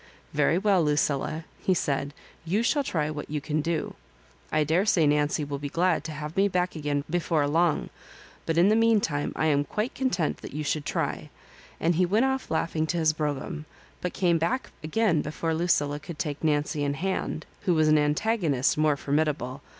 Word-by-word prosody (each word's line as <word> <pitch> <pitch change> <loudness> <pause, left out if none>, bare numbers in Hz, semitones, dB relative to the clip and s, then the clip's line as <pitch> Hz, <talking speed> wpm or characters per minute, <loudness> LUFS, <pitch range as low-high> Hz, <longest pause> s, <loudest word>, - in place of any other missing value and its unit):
"Very 165 - +3
well, 195 -3 +3
Lucilla," 150 +1 0 0.2
he 185 - +2
said; 140 -3 -1 0.3
*you 195 +7 0
shall 285 +4 +2
try 155 - -1
what 150 -1 -6
you 150 0 -2
can 150 +2 -1
do. 165 0 -2 0.6
I 155 0 +3
daresay 165 +2 +3
Nancy 150 +1 +2
will 140 -1 -4
be 145 0 -4
glad 170 +1 +1
to 160 - -4
have 150 +1 -6
me 195 +1 +4
back 180 -2 -1
again 145 -2 -1
before 160 -3 +1
long; 165 +2 +1 0.6
but 165 - 0
in 175 +4 +6
the 215 - +4
meantime 215 -10 +2
I 155 - 0
am 145 -2 +3
quite 210 - -3
content 220 - 0
that - - -10
you 150 - -2
should 150 0 -2
try," - - -2 0.5
and 170 +2 +2
he 180 +2 +2
went 215 +8 +3
off 265 0 -1
laughing 160 0 0
to 175 - -1
his 160 -1 +3
.brougham, 150 +1 -3 0.4
but 180 - -2
came 175 -3 +2
back 240 +11 -1
again 165 0 +2
before 160 +2 -2
Lucilla 150 -3 +1
could 155 +1 -9
take 145 -1 -4
Nancy 150 -1 +1
in 140 0 0
hand, 180 -1 -2 0.2
who 180 -4 +3
was 155 -1 +3
an 155 0 +5
antagonist 150 - +1
more 155 -2 +3
formidable. 145 -2 -1
155 Hz, 190 wpm, -27 LUFS, 150-180 Hz, 0.6 s, in